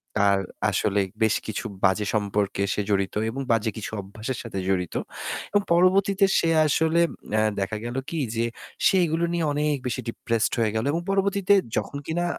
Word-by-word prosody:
তার 100 -1 +4 0.3
আসলে 100 +1 +1 0.2
বেশ 110 - +3
কিছু 110 - -4 0.2
বাজে 100 +2 +3
সম্পর্কে 100 -1 0
সে 105 - -1
জড়িত 100 -1 0
এবং 135 +4 -4
বাজে 115 0 +2
কিছু 110 - -5
অভ্যাসের 110 +6 -6
সাথে 110 -5 -5
জড়িত। 90 -3 -1 0.6
এবং - - +7
পরবর্তীতে 195 +3 +4
সে 165 - +1 0.2
আসলে 160 +3 +2 0.3
অ্যা 110 - +3 0.2
দেখা 105 +2 -2
গেল 120 +2 -4
কি 165 - -3 0.2
যে 115 +1 +1 0.4
সে - - +5
এইগুলো 165 +1 0
নিয়ে 170 -2 0
অনেক 150 0 +1
বেশি 120 - -2
ডিপ্রেসড 115 -1 -1
হয়ে 110 -2 +1
গেল। 110 - 0
এবং 165 +2 -1
পরবর্তীতে 195 0 +2 0.2
যখন 140 - -2
কিনা 175 +2 0
115 Hz, 170 wpm, -25 LUFS, 105-170 Hz, 0.6 s, এবং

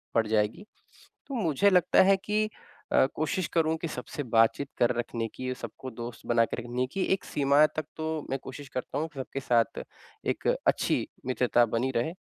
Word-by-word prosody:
पड़ 115 -1 +3
जाएगी। 110 - 0 0.6
तो 275 - -6
मुझे 185 - +3
लगता 180 -3 +5
है 195 0 +5
कि 215 +1 +1 0.4
अ, - - +6
कोशिश 155 +3 -1
करूँ 160 -1 +2
कि 170 - -1
सबसे 145 0 -5
बातचीत 115 +3 +2
कर 120 - +3
रखने 115 -1 -2
की 130 - -5
और 130 - -2
सबको 130 +1 -8
दोस्त 120 -1 -8
बना 120 -1 +4
के - - -5
रखने 120 +2 -2
की 195 - 0
एक 190 - -2
सीमा 145 +1 +4
तक 155 -1 -4
तो 160 - -3 0.2
मैं 135 - -1
कोशिश 135 +1 -9
करता 130 -2 -4
हूँ 160 +2 -2
सबके 135 0 -4
साथ 120 -5 +1 0.5
एक - - -1 0.2
अच्छी - - +2 0.2
मित्रता 125 -1 +3
बनी 120 +3 -1
रहे। 120 +7 +1
130 Hz, 185 wpm, -28 LUFS, 120-160 Hz, 0.6 s, अ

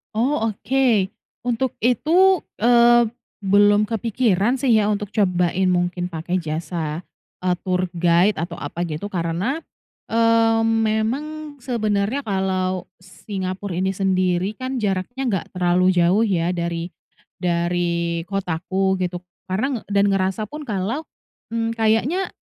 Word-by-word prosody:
Oh, 230 -1 +1
oke. 235 -3 +1 0.4
Untuk 245 +1 0
itu, 330 - +3 0.2
eee, 240 0 +5 0.3
belum 205 +1 +4
kepikiran 225 +1 +1
sih 255 -5 +3
ya 210 0 +2
untuk 205 0 -2
cobain 180 -3 +1
mungkin 175 0 -1
pakai 165 +2 -3
jasa, 160 -1 -3 0.4
eee, 180 -1 +1
tour 185 -1 0
guide 175 +4 +3
atau 170 +1 -5
apa 165 +4 -4
gitu 160 +3 -4
karena, 185 - -2 0.5
eee, 230 0 +4
memang 240 +8 -1
sebenarnya 220 +1 -1
kalau 185 -2 -1 0.2
Singapura 185 +1 -6
ini 190 +2 -1
sendiri 185 0 +1
kan 255 -3 -3
jaraknya 200 +7 -2
nggak 190 - -2
terlalu 180 +1 +3
jauh 180 +6 +4
ya 175 -2 +1
dari 170 0 -3 0.5
dari 170 -1 0
kotaku 190 0 -1
gitu 180 0 -3 0.3
karena 240 +7 -1
dan 200 0 +3
ngerasa 190 +2 0
pun 300 +8 -8
kalau, 215 +9 -2 0.5
mmm, 230 0 0
kayaknya 230 - +1
195 Hz, 120 wpm, -22 LUFS, 180-230 Hz, 0.5 s, eee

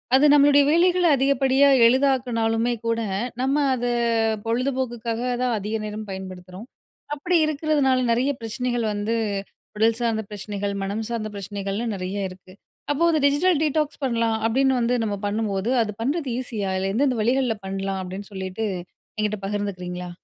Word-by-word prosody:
அது 275 - +5
நம்மளுடைய 285 0 +6
வேலைகள 355 +2 +3
அதிகப்படியா 270 +1 +3 0.2
எளிதாக்குனாலுமே 240 -3 +2
கூட, 230 0 +1 0.4
நம்ம 270 +2 +1 0.2
அத 245 -1 -3 0.6
பொழுதுபோக்குக்காக 240 -1 -2 0.2
தான் 245 -2 +1
அதிக 210 +2 -3
நேரம் 210 0 -6
பயன்படுத்துறோம். 185 +2 -8 0.5
அப்புடி 340 +4 +1
இருக்குறதுனால 295 -3 +1
நெறைய 245 +4 +2
பிரச்சனைகள் 240 +1 -2
வந்து, 205 +2 -1 0.6
உடல் 225 +1 +3
சார்ந்த 225 -2 0
பிரச்சனைகள், 205 0 -4
மனம் 205 +3 -3
சார்ந்த 225 -2 -3
பிரச்சனைகள்லாம் 200 +3 -3
நெறைய 190 +1 -3
இருக்கு. 185 0 -14 0.4
அப்போ 290 +3 0
வந்து 320 -3 +2
டிஜிட்டல் 305 +3 +2
டீடாக்ஸ் 300 -1 0
பண்ணலாம் 230 -3 +1
அப்டின்னு 265 +3 +2
வந்து 240 +1 +1
நம்ம 210 -2 -1
பண்ணும்போது, 205 0 -1
அது 210 - -4
பண்றது 285 +4 -1
ஈஸியா? 225 -6 -3
அதில 190 +1 -1
எந்தெந்த 255 +2 +1
வழிகள்ல 245 +1 +1
பண்லாம் 195 0 -3
அப்டின்னு 190 +3 -8
சொல்லிட்டு 190 +3 -4 0.5
என்கிட்ட 215 -1 -1
பகிர்ந்துக்குறீங்களா? 180 -3 -4
230 Hz, 135 wpm, -23 LUFS, 205-265 Hz, 0.6 s, நம்மளுடைய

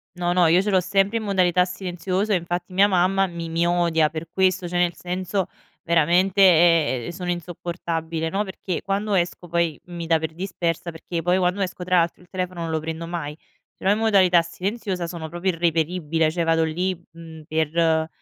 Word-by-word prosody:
No, 175 0 0
no, 180 -2 +4
io 170 +3 +5
ce 205 +1 -1
l'ho 190 - +4
sempre 195 +4 +1
in 225 - -4
modalità 185 -3 +3
silenziosa, 185 +2 -2
infatti 175 0 -2
mia 195 +2 +5
mamma 195 0 +2
mi 170 -2 -6
mi 165 +1 0
odia 170 -3 +2
per 160 +1 -6
questo, 185 -1 +1
cioè 175 0 -1
nel 175 -1 +1
senso 185 +1 -3 0.4
veramente, 175 +4 +3 0.6
ehm, - - -5
sono 180 0 -5
insopportabile, 170 -2 -3
no, 195 +4 0
perché 190 -2 -5
quando 200 +2 -2
esco 175 -1 -1
poi 170 -3 0
mi 175 -2 -7
dà 165 0 +4
per 160 0 -4
dispersa, 175 -1 -3
perché 165 +1 -9
io 165 - +1
poi 180 +2 +2
quando 185 +2 0
esco, 185 -1 -3
tra 180 0 +2
l'altro, 170 +1 -1
il - - -22
telefono 185 -2 -4
non 165 -1 -3
lo 160 - 0
prendo 160 +1 -5
mai. 160 -3 -5 0.4
Ce - - -16
l'ho 195 - +5
in 210 - +1
modalità 190 -6 +4
silenziosa, 185 +2 -4
sono 165 -2 -6
proprio 175 +3 -1
irreperibile. 165 -1 0
Cioè 170 +1 -1
vado 165 0 +2
lì, 175 +3 -1
mhmm, 165 -1 -11
per 160 0 +1
175 Hz, 195 wpm, -23 LUFS, 165-185 Hz, 0.6 s, io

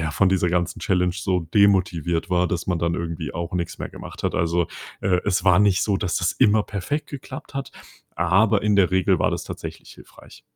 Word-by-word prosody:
ja, 80 -1 -1
von 95 +5 +2
dieser 90 -2 +2
ganzen 90 0 -1
Challenge 90 -2 +1
so 90 -1 0
demotiviert 90 -1 +1
war, 90 0 +2
dass 85 -1 -3
man 90 -2 0
dann 85 +1 0
irgendwie 85 -3 -4
auch 85 +1 -4
nix 85 -2 -3
mehr - - -5
gemacht - - -10
hat. - - -1
Also, 85 +1 +1 0.3
äh, 90 -2 +1
es 95 -1 0
war 90 0 +5
nicht 100 -2 +3
so, 100 -2 +1
dass 90 -3 -2
das - - +1
immer 105 0 +3
perfekt 105 +11 -4
geklappt 135 -1 -9
hat, 135 0 -4 0.5
aber 95 +6 +3
in 105 -1 +2
der 95 -2 +4
Regel 95 -1 +2
war - - +2
das - - -3
tatsächlich - - -8
hilfreich. - - -16
90 Hz, 210 wpm, -23 LUFS, 85-100 Hz, 0.5 s, war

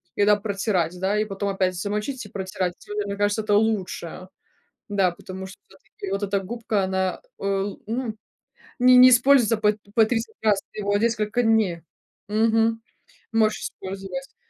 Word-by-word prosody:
иногда 205 0 +4
протирать, 195 -4 -1
да, 200 +3 +1
и 215 - +1
потом 200 -1 -3
опять 185 -2 0
замочить 210 +7 -3
и 205 - -11
протирать, 185 -2 -3
это, 210 0 -3
мне 200 - -3
кажется, 205 +1 +1
это 210 -1 0
лучше, 190 -4 -1 0.6
да, 195 -3 +2
потому 185 +2 -8
что 190 - -11
всё-таки 195 0 -10
вот 195 +1 -1
эта 200 0 0
губка- 220 0 -2
она, 190 0 -1 0.2
э, 195 0 0 0.2
ну, 230 -1 -3 0.6
не 250 0 +7
не 255 +1 +10
используется 245 -2 +5
по 210 -1 +3 0.2
по 225 -2 +6
30 225 0 -2
раз, 205 -2 +3
ты - - -7
его 205 0 +1
несколько 225 +1 0
дней 215 -7 +2 0.5
мгм, 225 +1 +2 0.5
можешь 215 -1 +2
использовать. 195 +8 -7
205 Hz, 155 wpm, -24 LUFS, 195-225 Hz, 0.6 s, не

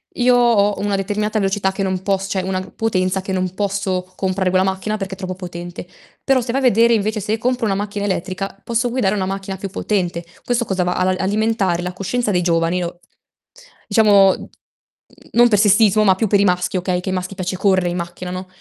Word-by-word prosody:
io 250 0 +4
ho 220 -4 +3
una 205 0 0
determinata 210 +2 -1
velocità 195 -1 0
che 190 - -5
non 190 -1 -1
poss 195 0 0
cioè, 190 - 0
una 185 0 -2
potenza 190 -4 0
che 190 - -6
non 185 -1 -1
posso 190 -2 -2
comprare 190 0 0
quella 185 +1 +2
macchina 190 +3 -2
perché 195 -2 -5
è - - -7
troppo 185 -1 -5
potente. 175 -1 -8 0.4
Però, 270 -2 +3
se 240 0 -3
vai 265 - 0
a - - -3
vedere 235 0 +5
invece, 215 0 0
se 215 +3 -1
compro 250 +2 -1
una 200 -3 +1
macchina 205 0 -3
elettrica, 195 0 -3
posso 235 +1 -1
guidare 225 -5 0
una 190 -2 -1
macchina 195 0 -4
più 195 +1 -6
potente. 180 -4 -2 0.2
Questo 240 -1 0
cosa 190 -3 0
va, 180 0 0
a 185 - +1
la 185 0 +2
alimentare 200 -3 0
la 180 0 -4
coscienza 205 +5 -2
dei 180 -2 +1
giovani 170 +1 +1
o 175 0 -6 0.9
diciamo, 200 -4 +4 0.8
non 240 +1 +5
per 210 - +3
sessismo, 210 0 +4
ma 195 -2 +5
più 220 +4 0
per 205 0 +3
i - - +4
maschi, 180 -1 +1
okay, 180 0 -1
che 185 - -4
ai 190 - -1
maschi 185 +1 -4
piace 185 0 -3
corre 185 -2 +2
i 175 - -3
macchina, 175 +1 -5
no? 185 +1 -6
195 Hz, 215 wpm, -19 LUFS, 185-210 Hz, 0.9 s, vedere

